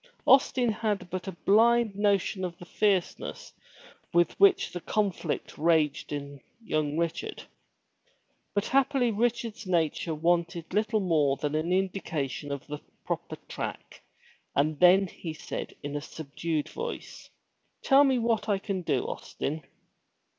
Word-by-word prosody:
Austin 255 Hz, -3 st, +5 dB
had 210 Hz, -4 st, -2 dB
but 185 Hz, +1 st, -4 dB
a -, -, -2 dB
blind 220 Hz, +5 st, +3 dB
notion 200 Hz, -1 st, +1 dB
of 175 Hz, -2 st, -4 dB
the 175 Hz, -, -11 dB
fierceness 195 Hz, -2 st, -1 dB, 0.6 s
with 175 Hz, 0 st, +3 dB
which 395 Hz, -1 st, +5 dB
the 175 Hz, -, -5 dB
conflict 195 Hz, -7 st, -2 dB
raged 155 Hz, -2 st, +2 dB
in 140 Hz, -1 st, -5 dB, 0.2 s
young 155 Hz, -9 st, -1 dB
Richard. 170 Hz, -1 st, -2 dB, 1.1 s
But 205 Hz, -, +1 dB
happily 270 Hz, -2 st, +2 dB
Richard's 230 Hz, -1 st, -1 dB
nature 165 Hz, -2 st, 0 dB
wanted 170 Hz, +1 st, 0 dB
little 215 Hz, 0 st, +1 dB
more 150 Hz, -7 st, +2 dB
than 145 Hz, +1 st, -2 dB
an 155 Hz, +3 st, 0 dB
indication 160 Hz, -7 st, -1 dB
of 140 Hz, -1 st, -4 dB
the 150 Hz, 0 st, -6 dB, 0.3 s
proper -, -, -3 dB
track -, -, -6 dB, 0.5 s
and 150 Hz, +1 st, +1 dB
then 185 Hz, +2 st, +7 dB
he 165 Hz, -2 st, -7 dB
said -, -, -6 dB
in 145 Hz, 0 st, -4 dB
a 145 Hz, -, -2 dB
subdued 155 Hz, +1 st, -3 dB
voice, 475 Hz, +1 st, -6 dB, 0.5 s
"Tell 275 Hz, +1 st, +6 dB
me 265 Hz, -2 st, +3 dB
what 225 Hz, -2 st, 0 dB
I 200 Hz, -, +3 dB
can 195 Hz, -1 st, -3 dB
do, 170 Hz, -, 0 dB
Austin." 155 Hz, +3 st, -4 dB
180 Hz, 135 wpm, -28 LUFS, 155-215 Hz, 1.1 s, then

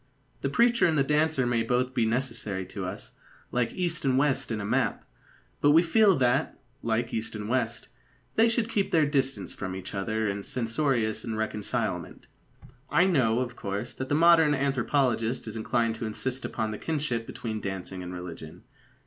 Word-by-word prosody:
The 140 Hz, -, 0 dB
preacher 235 Hz, -, +4 dB
and 160 Hz, -2 st, +1 dB
the 140 Hz, -, +4 dB
dancer 150 Hz, -1 st, +2 dB
may 120 Hz, -1 st, +1 dB
both 125 Hz, +3 st, 0 dB
be 120 Hz, -3 st, +2 dB
necessary 115 Hz, -6 st, -2 dB
to -, -, -5 dB
us, -, -, -8 dB, 0.4 s
like 125 Hz, -1 st, 0 dB
east 175 Hz, -3 st, -1 dB
and 130 Hz, -2 st, +2 dB
west 135 Hz, -2 st, +1 dB
in 110 Hz, -, -1 dB
a 100 Hz, -, -4 dB
map; -, -, 0 dB, 0.6 s
but 145 Hz, 0 st, +5 dB
we 165 Hz, +2 st, +6 dB
feel 200 Hz, +1 st, +4 dB
that, 125 Hz, -2 st, +1 dB, 0.2 s
like 115 Hz, +1 st, -1 dB
east 110 Hz, 0 st, -3 dB
and 105 Hz, -1 st, -5 dB
west, 120 Hz, -1 st, -1 dB, 0.5 s
they 225 Hz, +1 st, +4 dB
should 230 Hz, -1 st, +1 dB
keep 205 Hz, -4 st, 0 dB
their 160 Hz, -3 st, +4 dB
distance 135 Hz, -2 st, -1 dB
from 95 Hz, -2 st, -5 dB
each 95 Hz, +1 st, -7 dB
other 110 Hz, +2 st, -1 dB
in 100 Hz, 0 st, -2 dB
censorious 115 Hz, -1 st, 0 dB
irreconcilement. 110 Hz, -2 st, -3 dB, 0.6 s
I 175 Hz, -, +4 dB
know, 125 Hz, -10 st, +2 dB
of 125 Hz, -1 st, -4 dB
course, 105 Hz, +3 st, -4 dB
that 130 Hz, 0 st, -5 dB
the 145 Hz, -, +2 dB
modern 160 Hz, -2 st, +6 dB
anthropologist 130 Hz, -3 st, 0 dB
is 110 Hz, -, -6 dB
inclined 115 Hz, +1 st, 0 dB
to 110 Hz, -, -3 dB
insist 130 Hz, +4 st, -3 dB
upon 110 Hz, -1 st, -2 dB
the 105 Hz, -, -6 dB
kinship 145 Hz, -8 st, -2 dB
between 110 Hz, -2 st, -5 dB
dancing 95 Hz, -1 st, -5 dB
and 90 Hz, 0 st, -6 dB
religion. 90 Hz, -3 st, -8 dB
120 Hz, 175 wpm, -28 LUFS, 110-145 Hz, 0.6 s, we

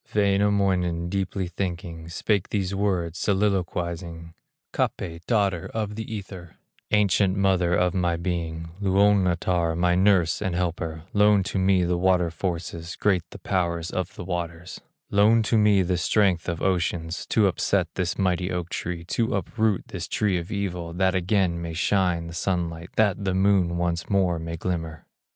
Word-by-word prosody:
Wainamoinen, 100 Hz, -4 st, +2 dB
deeply 95 Hz, 0 st, -2 dB
thinking, 85 Hz, -2 st, -5 dB
Spake 100 Hz, +3 st, 0 dB
these 100 Hz, -2 st, -1 dB
words 95 Hz, -4 st, -1 dB
soliloquizing: 85 Hz, -4 st, -1 dB, 0.4 s
"Kapé, 85 Hz, -2 st, -2 dB
daughter 100 Hz, -7 st, +1 dB
of 105 Hz, -2 st, -2 dB
the 110 Hz, +1 st, -6 dB
Ether, 95 Hz, -5 st, -8 dB, 0.3 s
Ancient 100 Hz, -2 st, +3 dB
mother 95 Hz, -3 st, +2 dB
of 90 Hz, 0 st, +2 dB
my 90 Hz, -2 st, +1 dB
being, 85 Hz, -2 st, -3 dB
Luonnotar, 95 Hz, -4 st, +2 dB
my 90 Hz, 0 st, +2 dB
nurse 95 Hz, -2 st, +3 dB
and 90 Hz, -2 st, -1 dB
helper, 85 Hz, -2 st, -3 dB
Loan 105 Hz, -1 st, +4 dB
to 95 Hz, 0 st, -2 dB
me 95 Hz, -1 st, +3 dB
the 85 Hz, 0 st, 0 dB
water 90 Hz, -2 st, +2 dB
forces, 85 Hz, 0 st, -4 dB
Great 95 Hz, -4 st, +2 dB
the -, -, -10 dB
powers 85 Hz, -3 st, -1 dB
of 95 Hz, 0 st, -3 dB
the -, -, -7 dB
waters; 85 Hz, -1 st, -5 dB, 0.3 s
Loan 110 Hz, +3 st, +4 dB
to 110 Hz, -, 0 dB
me 105 Hz, -3 st, +4 dB
the 90 Hz, 0 st, 0 dB
strength 90 Hz, -1 st, +2 dB
of 85 Hz, -1 st, -3 dB
oceans, 85 Hz, -3 st, -1 dB
To 110 Hz, -, +3 dB
upset 95 Hz, -1 st, +1 dB
this 90 Hz, -2 st, -2 dB
mighty 90 Hz, -1 st, 0 dB
oak 90 Hz, -2 st, -3 dB
tree, 85 Hz, -1 st, -4 dB
To 115 Hz, +6 st, -1 dB
uproot 105 Hz, +1 st, -1 dB
this 90 Hz, -3 st, -5 dB
tree 100 Hz, -3 st, 0 dB
of 85 Hz, +4 st, -8 dB
evil, 90 Hz, -5 st, -3 dB
That 95 Hz, +1 st, +2 dB
again 95 Hz, -2 st, +1 dB
may 85 Hz, -1 st, -5 dB
shine 90 Hz, -1 st, +1 dB
the 85 Hz, -, -8 dB
sunlight, 85 Hz, -1 st, -2 dB
That 105 Hz, -2 st, +2 dB
the 95 Hz, -1 st, 0 dB
moon 95 Hz, -3 st, +2 dB
once 85 Hz, -1 st, -2 dB
more 95 Hz, -4 st, +2 dB
may 85 Hz, 0 st, -5 dB
glimmer." 80 Hz, -2 st, -4 dB
90 Hz, 155 wpm, -25 LUFS, 85-100 Hz, 0.4 s, Loan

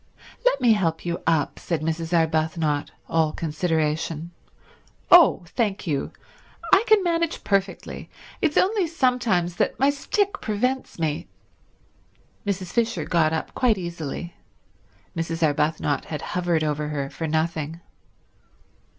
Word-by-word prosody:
"Let -, -, +3 dB
me 240 Hz, -3 st, +5 dB
help 170 Hz, -6 st, -1 dB
you 170 Hz, 0 st, -2 dB
up," 160 Hz, -4 st, +1 dB
said 165 Hz, -4 st, -2 dB
Mrs. 165 Hz, +1 st, -2 dB
Arbuthnot, 160 Hz, -2 st, +1 dB, 0.2 s
all 160 Hz, -1 st, +2 dB
consideration. 160 Hz, 0 st, -1 dB, 0.8 s
"Oh, 335 Hz, -, +7 dB
thank 210 Hz, -5 st, -1 dB
you—I 330 Hz, -, -1 dB
can 430 Hz, -3 st, +5 dB
manage 335 Hz, -2 st, 0 dB
perfectly. 195 Hz, -1 st, -2 dB, 0.3 s
It's 315 Hz, -5 st, +1 dB
only 390 Hz, -2 st, +3 dB
sometimes 240 Hz, -, +1 dB
that -, -, 0 dB
my 275 Hz, +1 st, +4 dB
stick 400 Hz, +8 st, -1 dB
prevents 250 Hz, +5 st, -1 dB
me—" 155 Hz, -3 st, -2 dB, 1.2 s
Mrs. 190 Hz, -2 st, -2 dB
Fisher 235 Hz, -1 st, 0 dB
got 165 Hz, -3 st, +2 dB
up 160 Hz, -, -3 dB
quite 240 Hz, -5 st, +2 dB
easily; 170 Hz, -1 st, -5 dB, 0.8 s
Mrs. 165 Hz, 0 st, -2 dB
Arbuthnot 150 Hz, -1 st, +1 dB
had 150 Hz, -, -5 dB
hovered 175 Hz, -3 st, +1 dB
over 150 Hz, 0 st, -1 dB
her 140 Hz, -2 st, -3 dB
for 165 Hz, -, -4 dB
nothing. 160 Hz, 0 st, -1 dB
170 Hz, 120 wpm, -24 LUFS, 155-235 Hz, 1.2 s, Oh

